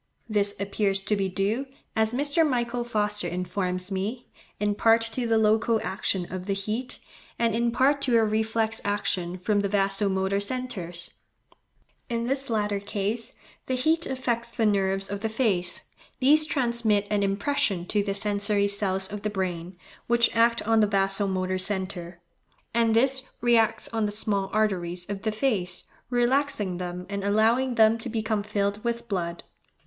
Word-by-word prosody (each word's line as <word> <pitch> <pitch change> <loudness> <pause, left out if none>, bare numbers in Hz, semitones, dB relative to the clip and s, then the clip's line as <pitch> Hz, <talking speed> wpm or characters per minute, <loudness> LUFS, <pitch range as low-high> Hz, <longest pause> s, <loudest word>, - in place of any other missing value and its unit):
This 205 -2 +1
appears 200 0 +1
to 210 +2 +1
be 195 -1 -1
due, 205 +8 -1 0.3
as 220 0 +2
Mr. 285 +6 +2
Michael 245 -4 0
Foster 210 -5 0
informs 180 +1 -2
me, 210 +6 -3 0.3
in 210 0 +1
part 225 +2 +4
to 230 +2 -2
the 225 -1 +3
local 220 +1 +3
action 190 0 -1
of 185 0 -5
the 195 - 0
heat, 215 +6 -2 0.4
and 230 -2 +1
in 235 +1 +1
part 275 +4 +2
to 250 -4 +3
a 225 - +4
reflex 220 +1 0
action 185 -3 -1
from 205 +3 +1
the 200 0 0
vaso 195 0 +2
motor 190 +1 0
centres. 200 -7 -3 0.9
In 235 -1 -1
this 270 +1 -2
latter 210 -2 0
case, 205 +3 -3 0.3
the 260 - 0
heat 320 +6 +1
affects 240 -3 -2
the 230 -1 -1
nerves 195 -1 +1
of 200 0 -4
the 220 +2 -2
face; 200 -7 0 0.4
these 305 +4 +5
transmit 235 -8 +1
an 205 -1 +2
impression 200 -2 0
to 210 - +2
the 200 -1 -2
sensory 205 0 +2
cells 195 -2 +1
of 205 +1 -6
the 215 - -1
brain, 180 -3 -4 0.3
which 235 0 +3
act 230 +1 +3
on 225 +1 +3
the 210 - +4
vaso 195 0 +1
motor 185 0 -1
centre, 185 -3 -2 0.5
and 230 -1 +3
this 260 +3 +3 0.2
reacts 225 -2 +2
on 225 -2 0
the - - -3
small 200 -2 -1
arteries 180 -5 -1
of 195 -1 -4
the 220 - -1
face, 210 -6 0 0.3
relaxing 245 -6 +1
them 180 0 -5
and 200 0 -4
allowing 225 +5 +2
them 225 0 +5
to 235 - -5
become 220 -1 -1
filled 205 0 -2
with 235 0 -2
blood. 170 -4 -3
210 Hz, 165 wpm, -26 LUFS, 195-235 Hz, 0.9 s, these